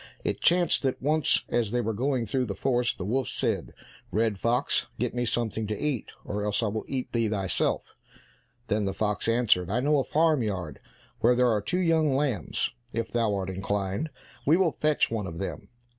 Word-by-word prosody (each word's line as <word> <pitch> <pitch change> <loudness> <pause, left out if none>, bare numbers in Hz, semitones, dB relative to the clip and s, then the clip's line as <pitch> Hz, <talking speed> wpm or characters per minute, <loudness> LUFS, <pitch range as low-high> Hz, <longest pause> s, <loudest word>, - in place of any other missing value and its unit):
It - - -2
chanced 175 +1 +3
that 130 -2 -1
once 150 +2 +2
as 120 -3 +1
they 120 +3 0
were 115 -1 -1
going 130 +1 0
through 125 +4 0
the 100 -4 -4
forest, 125 0 +1
the 90 - -4
wolf 130 +5 0
said, - - -1 0.4
"Red 110 -2 0
fox, 120 +6 +1
get 125 -1 -1
me 120 0 -1
something 110 -2 -1
to 105 0 -2
eat, 145 -6 -2 0.2
or 105 0 -3
else 105 +2 0
I 110 - +1
will 110 +1 -3
eat 130 -2 -4
thee 115 -2 +1
thyself." 100 -3 -1 0.7
Then 105 -2 0
the 95 0 -2
fox 105 +1 -1
answered, 115 -7 +3
"I 115 +5 +1
know 145 +3 +3
a - - +1
farm 155 -1 +2
yard 95 -8 -3 0.4
where 120 +2 +4
there 125 -1 +4
are 105 -2 +1
two 170 - -1
young 160 -5 +3
lambs; 135 - 0 0.2
if 115 -1 -3
thou 115 -3 +1
art 95 -1 -2
inclined, 100 - -2 0.3
we 155 +4 +4
will 185 -4 +3
fetch 150 -5 +2
one 105 -4 -2
of 85 -2 -7
them." 95 - -5
115 Hz, 200 wpm, -27 LUFS, 105-135 Hz, 0.7 s, where